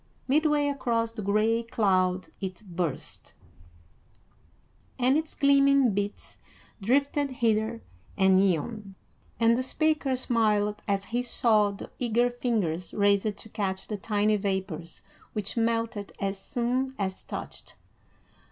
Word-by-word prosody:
Midway 300 +1 +3
across 230 -5 -1
the 225 - -6
gray 215 +3 +2
cloud 185 -5 +1
it 190 +1 -5
burst, 175 -5 -4 1.6
and 255 +2 +3
its 315 0 -2
gleaming 275 -3 +4
bits 205 +1 -4 0.4
drifted 280 +6 +1
hither 225 -2 0 0.3
and 190 0 +5
yon, 195 +3 -1 0.4
and 230 0 +5
the 250 - 0
speaker 300 0 +1
smiled 215 -4 +1
as 200 -1 0
he 240 - +2
saw 220 -4 +3
the 200 - -8
eager 240 0 +2
fingers 205 -9 -2
raised 200 0 +2
to 220 - -8
catch 190 -3 -3
the 210 - -3
tiny 210 +1 +1
vapors 190 -4 -4 0.3
which 210 -2 -3
melted 230 -3 -1
as 195 0 -2
soon 250 +5 -1
as 190 -2 -3
touched. - - -8
215 Hz, 120 wpm, -27 LUFS, 195-245 Hz, 1.6 s, and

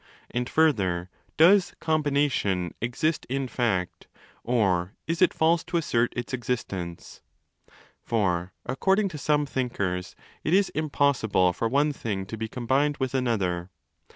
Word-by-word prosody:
And, 125 +1 -2
further, 95 - +1 0.3
does 180 +4 +5
'combination' 140 - 0
exist 135 +7 -1
in 135 0 -1
fact, 110 -7 -1 0.4
or 95 -6 +1
is 165 +2 -2
it 185 - +6
false 165 +1 +2
to 175 0 -1
assert 120 -7 +1
its 120 +2 -4
existence? 100 -9 -4 0.8
For, 90 -5 0
according 190 +10 +1
to 155 -4 -7
some 150 +1 +2
thinkers, 100 -9 -2 0.3
it 160 - +2
is 200 0 +3
impossible 140 - +1
for 115 - -1
one 145 +4 +3
35 - - -19
thing 95 -4 -2
to 100 - -6
be 110 0 -4
combined 135 +5 0
with 130 -1 -2
another. 95 -9 0
125 Hz, 135 wpm, -26 LUFS, 95-150 Hz, 0.8 s, it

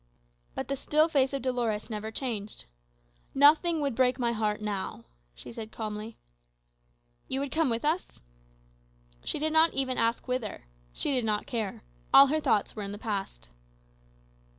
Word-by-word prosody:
But - - -4
the 275 - -1
still 305 +3 +2
face 270 -4 +2
of 275 -2 -3
Dolores 240 -5 -1
never 215 0 -4
changed. 220 - -4 0.7
"Nothing 305 +4 +5
would 280 -3 0
break 250 +1 +2
my 240 -2 0
heart 215 -2 -1
now," 200 - -4 0.3
she - - -10
said 225 -1 -7
calmly. 215 0 -6 1.1
"You 265 - -1
would 280 0 -3
come 320 -3 +2
with 230 +3 -1
us?" 325 +5 -1 1.0
She - - -1
did 310 +1 -1
not 320 +1 +5
even 260 -2 0
ask 230 +3 0
whither. 250 - -3 0.3
She - - 0
did 250 -2 +2
not 210 -1 0
care: 220 - -4 0.3
all 275 - +10
her 310 - +2
thoughts 210 - +1
were 215 - -5
in 200 0 -5
the - - -6
past. 200 - -4
235 Hz, 160 wpm, -29 LUFS, 215-275 Hz, 1.1 s, all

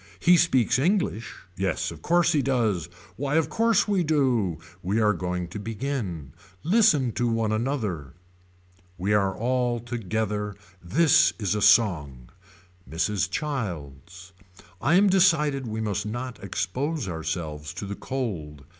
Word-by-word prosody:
He 180 +1 +5
speaks 130 -7 +3
English. 170 - 0 0.2
Yes 90 -1 -1
of 80 -2 -11
course 170 - +3
he 150 -4 +2
does. 110 -10 0 0.3
Why 140 +2 -1
of 160 -1 +2
course 225 -3 +2
we 200 -4 +2
do. 130 - +1 0.2
We 100 +5 0
are 105 -1 +3
going 90 0 -3
to 95 - -6
begin. 105 - -4 0.3
Listen 165 - +3
to 120 +2 -1
one 115 -2 0
another. 110 - -2 0.8
We 95 +4 0
are 100 -2 +1
all 125 0 0
together. 110 -3 -3 0.3
This 145 - +4
is 100 -4 -1
a 105 - -2
song. 75 - +3 0.6
Mrs. 90 +4 -1
Childs. 90 - -5 0.5
I 150 +7 +3
am 195 +3 +6
decided 155 -8 +3
we 110 0 -3
must 105 -1 -2
not 120 +1 -6
expose 125 - -2
ourselves 80 -3 -4
to - - -5
the 100 - -5
cold. 90 - -5
110 Hz, 135 wpm, -25 LUFS, 90-140 Hz, 0.8 s, am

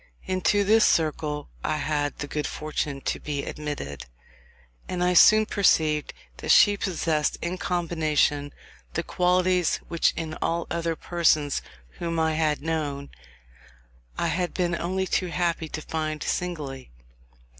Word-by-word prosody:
Into 190 +2 +2
this 220 +3 +5
circle 150 -2 0
I 155 - 0
had 145 -1 -1
the 150 - -5
good 150 +1 -2
fortune 150 -2 -3
to - - -2
be 145 -2 -3
admitted, 105 - -5 0.8
and 180 -1 -1
I 180 0 +3
soon 215 +5 +7
perceived 155 -8 +2 0.3
that - - -7
she 205 - +7
possessed 165 -6 0
in 175 +2 -3
combination, 155 -4 0 0.4
the - - 0
qualities 180 -1 +2
which 170 - +2
in 160 -1 -3
all 170 0 0
other 170 -1 -1
persons 155 -5 +1 0.4
whom 165 -1 -2
I 160 0 +2
had 155 -2 0
known 145 -3 -3 1.1
I - - 0
had 180 0 -2
been 175 -2 0
only 185 +3 -1
too 185 0 0
happy 170 -2 -1
to 155 - -5
find 155 -1 -3
singly. 150 -7 -3
160 Hz, 135 wpm, -26 LUFS, 150-180 Hz, 1.1 s, soon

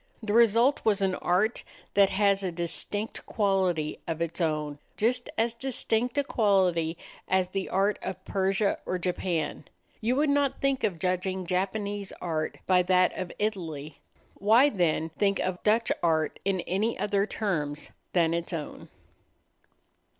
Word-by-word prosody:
The 210 -1 -1
result 235 +4 +4
was 205 -3 +2
an 190 -1 +2
art 185 +6 +1 0.3
that 200 -1 +5
has 200 0 +2
a 185 - -1
distinct 175 +5 -3
quality 190 -7 0
of 165 -1 -3
its 170 +1 -2
own 150 -3 -1 0.2
just 240 +3 +1
as 225 +1 +1
distinct 245 0 -1
a 285 - +3
quality 185 -9 +2 0.3
as 185 -1 +1
the 195 0 -3
art 195 +2 +1
of 185 0 -6
Persia 195 +1 +1
or 185 - 0
Japan. 175 -3 -2 0.4
You 235 +3 +1
would 290 +1 +2
not 285 -1 +1
think 275 -1 0
of 185 -5 0
judging 185 +1 -1
Japanese 200 +2 -2
art 160 -3 -3
by 185 -1 +4
that 180 0 +3
of 185 -2 -4
Italy. 160 -9 -3 0.4
Why 225 +8 +5
then 165 -4 +1
think 200 -1 +2
of 185 -1 -2
Dutch 225 +2 +2
art 160 -2 +1
in 190 -2 0
any 205 +7 -1
other 200 0 0
terms 150 -11 -3 0.2
than 165 -2 +3
its 170 +1 -2
own? 155 -3 -6
190 Hz, 150 wpm, -28 LUFS, 175-215 Hz, 0.4 s, that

